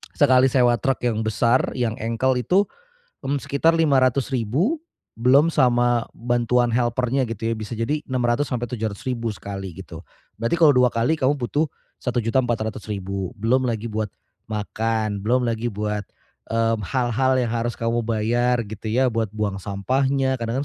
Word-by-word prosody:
sekali 130 -2 +5
sewa 125 -2 +4
truk 135 -1 0
yang 115 -3 0
besar 115 +3 +2
yang 115 -3 -1
engkel 115 +4 0
itu, 185 +10 +3 0.6
mmm, 140 +2 0
sekitar 140 +5 +2
Rp500.000 135 - +2 0.4
belum 130 +7 +4
sama 120 -4 +2
bantuan 120 0 +1
helper-nya 125 +2 +1
gitu 115 0 -2
ya, - - 0
bisa 110 0 -7
jadi 120 +7 -1
Rp600.000-RP700.000 120 -2 -1
sekali 95 -2 -7
gitu, 90 -3 -10 0.4
berarti 115 +9 +1
kalau 155 -3 +7
2 125 0 +5
kali 120 +7 +1
kamu 130 +2 +3
butuh 140 +4 0 0.4
Rp1.400.000, 110 -5 -2
belum 125 +4 +2
lagi 115 0 -2
buat 110 0 -1 0.4
makan, 110 0 -2
belum 125 +5 +1
lagi 115 0 -1
buat 105 0 -2 0.5
,mmm, 115 0 +1
hal-hal 130 +4 +1
yang 120 -3 0
harus 120 0 -2
kamu 115 +1 0
bayar 120 +2 +1
gitu 110 +1 -7
ya 125 +2 +2
buat 115 -1 0
buang 100 -2 -2
sampahnya, 130 +7 0
kadang 115 +4 -2
120 Hz, 140 wpm, -23 LUFS, 110-130 Hz, 0.6 s, kalau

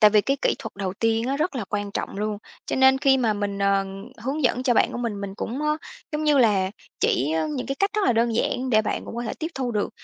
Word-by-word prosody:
tại 210 -2 +8
vì 210 0 +5
cái 275 +6 0
kỹ - - +3
thuật 225 -5 -7
đầu 195 -2 -2
tiên 225 +2 +1
á 275 - 0
rất 310 +2 -1
là 230 - -2
quan 205 -1 -2
trọng 200 - -4
luôn. 210 0 -2 0.3
Cho - - -1
nên 265 0 +6
khi 270 -1 +4
mà 230 -4 +2
mình, 205 -1 -3
ờ, 200 0 +2 0.4
hướng 275 +6 -2
dẫn 255 0 +2
cho 250 -3 +2
bạn - - +3
của - - -4
mình, 230 -4 -3
mình 195 -1 -5
cũng 255 +9 -4
á 300 0 +1 0.4
giống 305 +1 -1
như 295 -2 +4
là 200 -6 +3 0.3
chỉ, 140 +5 +2
ơ, 160 -1 +1
những 150 - -3
cái 275 - -2
cách 395 0 +2
rất 425 -1 +2
là 245 - +4
đơn 230 0 +2
giản 255 +2 0
để 215 -2 +4
bạn - - -2
cũng - - -8
có 240 - -2
thể 230 - -3
tiếp 320 - -2
thu 260 -2 -2
được, 210 -3 0
230 Hz, 285 wpm, -24 LUFS, 205-265 Hz, 0.4 s, tại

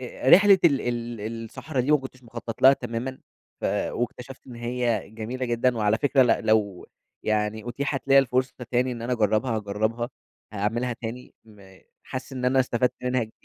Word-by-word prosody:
أ 130 +1 -4
رحلة 200 +2 +8
ال 140 -5 +5
ال 115 -2 -4
الصحرا 130 +4 -4
دي 135 +5 -1
ما - - +7
كنتش 130 -1 -10
مخطّط 115 -1 -8
لها 135 +1 +9
تمامًا، 125 +1 -4 0.4
ف - - -6 0.3
واكتشفت 125 +2 -5
إن 125 - -10
هي 120 -3 -2
جميلة 120 +4 -4
جدًا، 120 +1 +1
وعلى 105 0 +2
فكرة 140 -1 +4
لأ 120 - +3
لو 105 -4 +1 0.4
يعني 110 +1 -1
أُتيحَت 140 +2 -3
ليّا 135 - +7
الفرصة 130 0 +1 0.2
تاني 125 +1 +1
إن 115 - -7
أنا 120 +2 -2
أجرّبها 110 +1 +1
هاجرّبها، 110 +3 -2 0.4
هاعملها 115 +4 -1
تاني، 120 +1 -8
م 100 -4 -17 0.2
حاسس 130 +1 -7
إن 125 -1 -4
أنا 130 +1 +4
استفدت 125 0 +1
منها 125 -1 +1
ج 110 - -15
120 Hz, 175 wpm, -25 LUFS, 110-130 Hz, 0.4 s, لها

